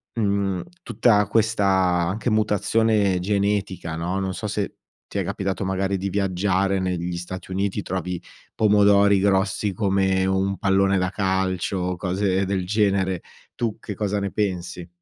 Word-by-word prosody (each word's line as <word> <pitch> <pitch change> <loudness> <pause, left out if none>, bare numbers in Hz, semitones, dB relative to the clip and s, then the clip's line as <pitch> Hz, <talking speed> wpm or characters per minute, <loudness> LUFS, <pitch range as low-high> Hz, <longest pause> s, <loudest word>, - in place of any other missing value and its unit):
è, - - -3
mhmm, 100 -3 0 0.2
tutta 105 -4 +3
questa 110 -1 +1
anche 95 +3 +1
mutazione 105 -2 +2
genetica, 100 -3 -1
no, 90 +4 -2
non 95 -1 -2
so 105 +5 -4
se 105 -2 -2 0.3
ti - - -3
è - - 0
capitato 95 0 -3
magari 95 +1 -1
di 95 +1 -2
viaggiare 95 0 0
negli 90 -1 -2
Stati 95 +2 -7
Uniti, 100 +2 -1
trovi 90 -2 -4 0.3
pomodori 100 -1 +4
grossi 95 +1 +1
come 95 -1 +1
un 95 +1 0
pallone 95 +1 +2
da 90 +1 0
calcio, 95 -1 -1
cose 95 +2 0
del 95 -1 -1
genere. 95 -3 +1 0.3
Tu 115 -3 -2
che 105 - -7
cosa 105 0 -1
ne 100 -1 -3
pensi? 90 -4 -3
95 Hz, 145 wpm, -23 LUFS, 95-100 Hz, 0.3 s, pomodori